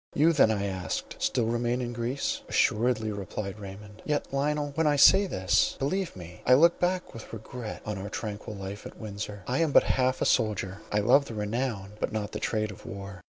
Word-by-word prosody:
"You 160 +4 +5
then," 140 -7 +5
I 100 -2 0
asked, 95 -2 -4
"still 120 - +1
remain 120 +2 0
in 120 -1 -3
Greece?" 120 +4 -2
"Assuredly," 110 -1 +2
replied 100 0 -5
Raymond. 105 +1 -10
"Yet 150 -2 -2
Lionel, 145 +1 0
when 160 +1 +1
I 145 - +4
say 195 +8 +7
this, 95 - +2
believe 180 +7 -1
me 90 -1 -10
I 125 - +6
look 170 +5 +5
back 180 +1 0
with 115 - -10
regret 115 +1 -7
to 105 - -2
our 100 +2 -5
tranquil 105 0 -5
life 100 +1 -6
at - - -13
Windsor. 105 -2 -6
I 130 +2 0
am 165 -3 +2
but - - +7
half 130 0 +1
a - - +1
soldier; 105 -3 +1
I 105 - +2
love 130 +7 +5
the 115 - -7
renown, 105 -1 -2
but - - -1
not 105 -1 -3
the - - -4
trade 110 -1 -1
of 95 - -12
war. 100 -5 -8
110 Hz, 205 wpm, -28 LUFS, 100-135 Hz, -, say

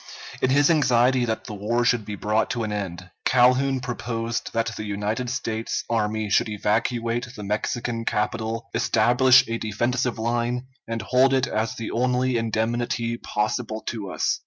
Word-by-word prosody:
In 130 - +2
his 145 +4 +4
anxiety 125 -4 +3
that 110 -1 -2
the - - -7
war 115 +4 0
should 115 -3 +2
be 105 - -5
brought 105 +2 0
to 120 -2 -2
an 110 - -3
end, 90 -3 -5
Calhoun 130 +1 +3
proposed 115 -2 -3
that 115 -1 -1
the - - -5
United 105 +4 -2
States 115 -3 -2
army 110 -1 0
should 105 +2 +2
evacuate 115 +3 0
the 105 - -7
Mexican 115 +3 -2
capital, 115 +1 -2
establish 120 +3 +4
a 115 0 -2
defensive 120 +3 -1
line, 120 +2 -1 0.2
and 115 0 -3
hold 130 +2 +4
it 130 -1 +2
as 110 +1 -2
the 115 - -5
only 125 +1 +1
indemnity 115 +1 -1
possible 110 0 -2
to 105 -5 -5
us. - - 0
115 Hz, 160 wpm, -24 LUFS, 110-125 Hz, 0.2 s, his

